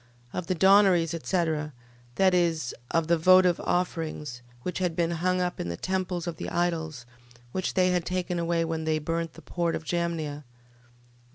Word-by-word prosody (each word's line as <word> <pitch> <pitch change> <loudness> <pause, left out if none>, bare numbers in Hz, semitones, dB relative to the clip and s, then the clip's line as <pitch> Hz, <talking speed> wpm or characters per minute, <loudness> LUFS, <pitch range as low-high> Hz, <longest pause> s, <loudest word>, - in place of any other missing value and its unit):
Of 180 -2 -4
the 185 - 0
donaries, 190 -2 +5
etc... 160 -3 -1 0.4
That 190 -1 +4
is, 165 -7 +1 0.2
of 165 -1 +1
the 170 0 +2
votive 185 +1 +6
offerings, 155 -7 -2 0.2
which 180 -1 -3
had 180 -3 0
been 170 0 +1
hung 180 +2 0
up 180 0 -2
in 85 - -3
the 85 - -4
temples 185 -2 -2
of 170 -2 -4
the - - -4
idols, 160 -7 -2 0.5
which 185 +5 -2
they 185 -1 +4
had 180 -1 +1
taken 180 0 -2
away 170 0 +1
when 160 -1 -3
they 155 0 +1
burnt 165 +1 -2
the 165 - -14
port 170 +2 -1
of - - -5
Jamnia, 165 -3 -2
ver. - - -16
170 Hz, 180 wpm, -27 LUFS, 160-180 Hz, 0.5 s, votive